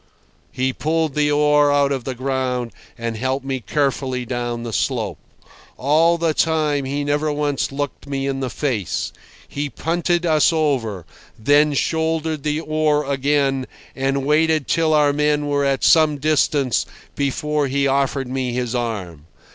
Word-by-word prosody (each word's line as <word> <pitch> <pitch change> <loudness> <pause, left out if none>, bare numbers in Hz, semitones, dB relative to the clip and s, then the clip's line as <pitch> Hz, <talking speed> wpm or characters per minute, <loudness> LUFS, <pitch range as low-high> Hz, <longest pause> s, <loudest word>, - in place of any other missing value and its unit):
He 130 +1 -1
pulled 160 0 -1
the 150 0 +1
oar 150 0 +4
out 140 -1 +3
of 135 -3 -2
the 130 - -3
ground 130 -2 -2 0.3
and 115 -1 -3
helped 130 +4 -2
me 135 -1 -2
carefully 130 0 -1
down 120 -1 -3
the 115 -2 -5
slope. 110 - -1 0.6
All 160 +5 +3
the 165 -1 +1
time 155 -3 +1
he 140 +2 -2
never 145 +1 0
once 145 -2 -1
looked 145 0 -5
me 135 -1 -2
in 135 -1 -2
the 130 -1 -2
face. 115 - -2 0.3
He 145 0 -4
punted 175 +3 -1
us 155 0 +4
over, 130 - -1 0.3
then 145 +5 +3
shouldered 160 +2 -1
the 150 +2 -1
oar 155 -1 +1
again 140 -1 0 0.3
and 135 0 -1
waited 155 0 +2
till 160 -1 +2
our 145 -1 +4
men 150 0 +1
were 145 0 +1
at 135 -1 0
some 155 -2 +5
distance 145 -3 +1 0.3
before 145 +1 -1
he 140 +1 0
offered 135 -1 0
me 130 -1 -2
his 125 -1 -2
arm. 100 -11 -4
140 Hz, 155 wpm, -20 LUFS, 130-150 Hz, 0.6 s, some